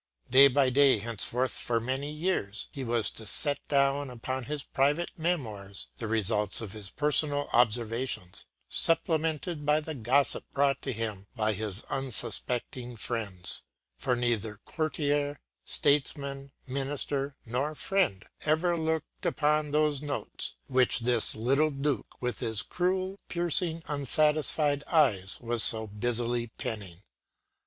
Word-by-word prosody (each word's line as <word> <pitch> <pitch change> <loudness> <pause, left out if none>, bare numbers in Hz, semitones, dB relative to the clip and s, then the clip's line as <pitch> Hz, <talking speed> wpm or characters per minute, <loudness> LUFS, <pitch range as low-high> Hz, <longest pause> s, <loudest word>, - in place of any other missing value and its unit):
Day 135 +2 +9
by 135 -1 +2
day, 135 -1 +5
henceforth 115 +4 0
for 115 -1 -1
many 130 +5 -3
years, 150 - -2
he 135 - -6
was 115 -2 +2
to 110 - -9
set 145 +5 +3
down 140 0 +2
upon 125 +1 -4
his 145 +1 -4
private 145 +6 0
“Memoirs” 110 - -3
the 115 - -3
results 105 -2 +1
of 110 -4 -6
his 105 -2 -7
personal 145 +1 +1
observations, 115 -4 +1 0.2
supplemented 160 -1 0
by 150 +1 +3
the 155 +1 -6
gossip 135 +2 +2
brought 140 -1 +2
to - - -3
him 110 -4 -4
by 110 -2 +1
his 105 0 -4
unsuspecting 125 -1 -2
friends; 105 -5 -3 0.3
for 130 -2 0
neither 115 -4 -1
courtier, 145 -2 -1 0.3
statesman, 140 -1 0
minister, 140 +1 -2
nor 135 +6 -2
friend 175 - 0 0.2
ever 160 +3 +2
looked 160 -1 -3
upon 150 0 +1
those 150 -1 +1
notes 145 -1 -4
which 130 -2 +4
this 120 -1 +1
“little 135 +7 +2
Duke 140 0 -3
with 125 -1 -3
his 110 -2 -1
cruel, 185 +2 -1
piercing, 170 -1 +1
unsatisfied 150 0 +2
eyes” 110 - +2
was 120 -1 +5
so 110 -1 +5
busily 120 +3 +2
penning. 100 -5 -6
135 Hz, 130 wpm, -29 LUFS, 115-150 Hz, 0.3 s, Day